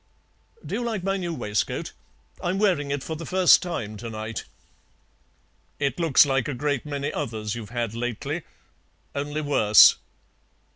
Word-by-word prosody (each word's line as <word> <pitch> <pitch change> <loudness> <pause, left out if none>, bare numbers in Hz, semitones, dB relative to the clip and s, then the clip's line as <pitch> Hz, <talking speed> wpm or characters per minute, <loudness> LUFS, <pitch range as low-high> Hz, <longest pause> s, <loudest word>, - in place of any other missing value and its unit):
Do - - -6
you 235 +4 -1
like 220 -6 -3
my 195 +1 0
new 175 -3 -3
waistcoat? 105 - -2 0.5
I'm 180 +2 0
wearing 180 -9 +1
it 140 -1 -2
for 160 - -4
the 160 - -7
first 185 +2 +5
time 110 - -4
to 115 +2 -7
night." 110 0 -5 1.3
"It 140 +3 -1
looks 160 -4 +5
like 135 -3 0
a 145 - -3
great 145 +1 -2
many 145 -1 -3
others 110 -6 -3
you've 115 -3 -7
had 120 -1 -3
lately, 120 -1 -3 0.7
only 145 +2 -3
worse. 110 -8 +6
140 Hz, 150 wpm, -25 LUFS, 115-165 Hz, 1.3 s, worse